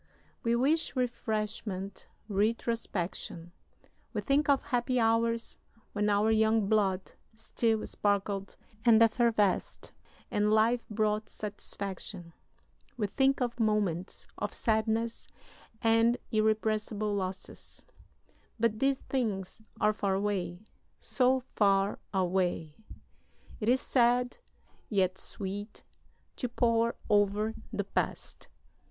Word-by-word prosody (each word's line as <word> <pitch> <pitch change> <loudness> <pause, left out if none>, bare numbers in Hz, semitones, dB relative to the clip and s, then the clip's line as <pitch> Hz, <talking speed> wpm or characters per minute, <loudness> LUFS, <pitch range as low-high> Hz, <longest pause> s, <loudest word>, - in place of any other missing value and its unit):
We 230 0 +1
wish 295 +8 +1
refreshment, 215 -5 -3 0.2
retrospection. 200 -5 -2 0.6
We - - -1
think 290 +1 +2
of 280 -1 +4
happy 245 0 0
hours 230 0 +1 0.3
when 210 0 +1
our 205 +2 +3
young 220 -1 +3
blood 195 -3 +1 0.2
still 225 0 0
sparkled 200 -1 -1 0.3
and 230 -2 +6
effervesced 225 -4 +1 0.4
and 210 0 +2
life 225 +3 +3
brought 215 0 0
satisfaction. 195 -3 -6 0.6
We 215 - 0
think 270 +6 +2
of 240 -1 -1
moments 205 -5 0
of - - -2
sadness 225 +1 0 0.6
and 225 +1 +4
irrepressible 215 -1 +1
losses. 190 -1 -5 0.7
But 220 -1 +1
these 270 +1 +2
things 220 -7 -3 0.2
are 215 - +3
far 200 -2 0
away, 190 -2 -2 0.3
so 260 0 +2
far 195 -1 +3
away! 180 -4 0 0.8
It 215 - 0
is 255 +1 +4
sad, 245 - +2 0.5
yet 190 -3 +1
sweet, 205 +2 -6 0.5
to 250 - -2
pore 230 -1 +2
over 205 +1 +2 0.2
the - - -1
past. - - -3
215 Hz, 100 wpm, -30 LUFS, 200-230 Hz, 0.8 s, and